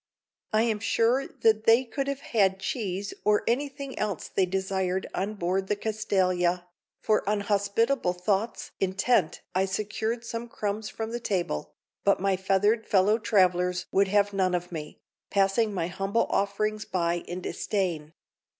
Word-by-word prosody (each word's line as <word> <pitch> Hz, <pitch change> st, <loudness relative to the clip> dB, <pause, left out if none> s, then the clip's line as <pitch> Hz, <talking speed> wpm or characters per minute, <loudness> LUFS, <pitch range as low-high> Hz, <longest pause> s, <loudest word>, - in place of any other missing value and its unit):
I 215 Hz, +1 st, +3 dB
am 220 Hz, -3 st, 0 dB
sure 230 Hz, +4 st, +2 dB
that 220 Hz, -1 st, +1 dB
they 230 Hz, +3 st, +6 dB
could 270 Hz, +4 st, -3 dB
have 280 Hz, 0 st, -3 dB
had 195 Hz, -6 st, +2 dB
cheese 200 Hz, -3 st, -3 dB
or 210 Hz, 0 st, +3 dB
anything 275 Hz, +2 st, -2 dB
else 205 Hz, -6 st, -2 dB
they 190 Hz, -, +1 dB
desired 190 Hz, 0 st, -1 dB
on 205 Hz, +3 st, -2 dB
board 190 Hz, +1 st, -1 dB
the 210 Hz, -, +1 dB
Castalia, 185 Hz, -5 st, 0 dB, 0.4 s
for 215 Hz, -, +3 dB
on 210 Hz, -1 st, +1 dB
hospitable 205 Hz, +2 st, +1 dB
thoughts 195 Hz, +5 st, -1 dB
intent 195 Hz, -1 st, +1 dB
I 190 Hz, +1 st, +2 dB
secured 220 Hz, +4 st, -2 dB
some 230 Hz, 0 st, -5 dB
crumbs 210 Hz, 0 st, -3 dB
from 225 Hz, 0 st, -5 dB
the 240 Hz, -, -3 dB
table, 180 Hz, -, -2 dB, 0.3 s
but 200 Hz, -, +3 dB
my 195 Hz, 0 st, +2 dB
feathered 200 Hz, +4 st, +1 dB
fellow 205 Hz, +3 st, +3 dB
travelers 180 Hz, -4 st, +2 dB
would 195 Hz, +1 st, +3 dB
have 205 Hz, +1 st, +2 dB
none 185 Hz, -2 st, +1 dB
of 180 Hz, 0 st, -4 dB
me, 150 Hz, -3 st, -6 dB, 0.3 s
passing 200 Hz, +3 st, +2 dB
my 180 Hz, -4 st, -1 dB
humble 195 Hz, +5 st, 0 dB
offerings 215 Hz, +2 st, 0 dB
by 170 Hz, -3 st, 0 dB
in 175 Hz, +1 st, -4 dB
disdain. 170 Hz, -7 st, -2 dB
200 Hz, 150 wpm, -27 LUFS, 185-220 Hz, 0.4 s, they